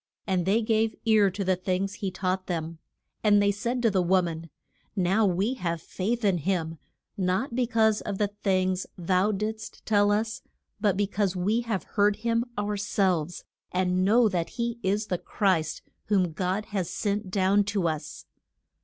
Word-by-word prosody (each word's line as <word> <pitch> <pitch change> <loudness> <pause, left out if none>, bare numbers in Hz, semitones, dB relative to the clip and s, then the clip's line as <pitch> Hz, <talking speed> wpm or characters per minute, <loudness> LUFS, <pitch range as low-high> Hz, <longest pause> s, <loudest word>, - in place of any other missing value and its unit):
And 185 -2 0
they 220 +4 +3
gave 220 0 +1
ear 215 -3 +5
to 195 +2 -4
the 185 0 +2
things 185 +2 -1
he 200 -2 -3
taught 185 0 -2
them. 165 -2 -3 0.4
And 205 -1 +5
they 200 0 +3
said 240 +4 -2
to 225 - +4
the 190 -2 +2
wo 185 +1 +3
man, 165 -1 -5 0.5
Now 195 +3 +3
we 195 +7 +1
have 170 -9 -2
faith 215 +8 -2
in 190 -4 +3
him, 165 -2 -2 0.4
not 190 +7 0
be 245 0 +1
cause 220 -2 +2
of 200 - -4
the 205 0 +1
things 185 -2 0
thou 185 +3 +2
didst 215 +2 -5
tell 205 -1 +3
us, 220 +2 -1 0.4
but 205 -3 +2
be 205 - +2
cause 200 -1 -1
we 205 +6 +1
have 215 -5 -1
heard 205 0 +2
him 230 +2 0
our 205 0 -1
selves, 185 -5 0 0.3
and 180 0 +1
know 225 +4 +5
that 175 -5 -1
he 235 0 -2
is 205 +2 0
the 180 -4 -2
Christ 180 -3 0 0.2
whom 190 -5 +2
God 185 +5 -2
has 190 -4 -1
sent 205 -1 -2
down 195 +2 +3
to 200 -4 0
us. 155 -1 -4
195 Hz, 180 wpm, -27 LUFS, 185-215 Hz, 0.5 s, ear